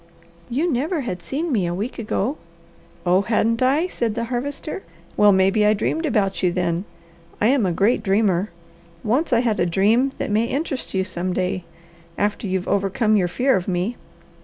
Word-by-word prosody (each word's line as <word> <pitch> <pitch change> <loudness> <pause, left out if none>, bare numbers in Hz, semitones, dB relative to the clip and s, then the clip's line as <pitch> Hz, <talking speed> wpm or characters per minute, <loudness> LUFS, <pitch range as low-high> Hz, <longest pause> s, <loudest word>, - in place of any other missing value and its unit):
"You 300 +7 0
never 300 +6 -1
had 185 -8 -4
seen 300 - -3
me 200 -8 +1
a 175 - -2
week 215 +8 -4
ago." 230 +4 -1 0.7
"Oh 180 +2 +4
hadn't 230 +2 +1
I?" 275 +6 +3
said 235 -11 -2
the 230 - -1
Harvester. 280 +8 -4 0.3
"Well 210 0 +6
maybe 195 +2 +3
I 210 +1 +4
dreamed 315 +10 -1
about 200 -7 0
you 180 - +2
then. 175 +1 -1 0.5
I 215 - +3
am 255 -7 +3
a - - +1
great 205 +7 +2
dreamer. 200 -1 +1 0.5
Once 260 +10 +1
I 235 -1 +4
had 230 -4 0
a 175 - +3
dream 215 +9 +3
that - - -3
may 220 +2 +2
interest 275 - -3
you 190 - +2
some 185 -1 -3
day, 185 -1 -2 0.5
after 205 +1 -1
you've 185 0 -2
overcome 200 +2 +1
your 185 -4 +2
fear 255 +9 +2
of 185 -2 -2
me. 185 +5 -1
215 Hz, 185 wpm, -22 LUFS, 190-250 Hz, 0.7 s, Well